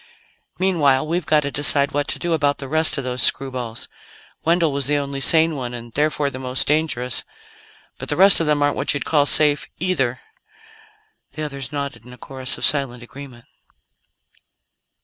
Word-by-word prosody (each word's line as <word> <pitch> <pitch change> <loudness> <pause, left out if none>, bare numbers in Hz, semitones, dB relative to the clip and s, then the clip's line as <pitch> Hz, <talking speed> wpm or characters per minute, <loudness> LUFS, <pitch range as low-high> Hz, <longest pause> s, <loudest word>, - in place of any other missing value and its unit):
"Meanwhile, 155 -8 +1
we've 170 +1 -3
got 155 -1 +3
to 140 -1 -5
decide 140 0 +4
what 145 0 -2
to - - -4
do 175 -1 -3
about 145 -2 0
the 135 - -8
rest 160 +3 +3
of 140 - -3
those 125 0 -4
screwballs. 125 -4 -2 0.6
Wendell 165 -1 +1
was 140 -1 -2
the 145 0 +1
only 140 -1 -4
sane 160 +2 +3
one, 125 -3 -6
and 120 -1 -10
therefore 150 -1 -1
the 130 - -8
most 130 0 -3
dangerous 145 -5 0 0.8
but - - -7
the - - 0
rest 195 +2 +7
of 165 - -1
them 150 -1 +1
aren't 145 - 0
what - - -1
you'd 145 - -4
call 145 -2 +1
safe, 150 -1 +6
either." 145 -9 -2 1.1
The 155 - -6
others 140 -4 -7
nodded 140 -5 -6
in 125 +1 -14
a - - -14
chorus 130 -1 -6
of - - -1
silent 130 -4 -1
agreement. 125 -2 -13
140 Hz, 180 wpm, -20 LUFS, 130-155 Hz, 1.1 s, rest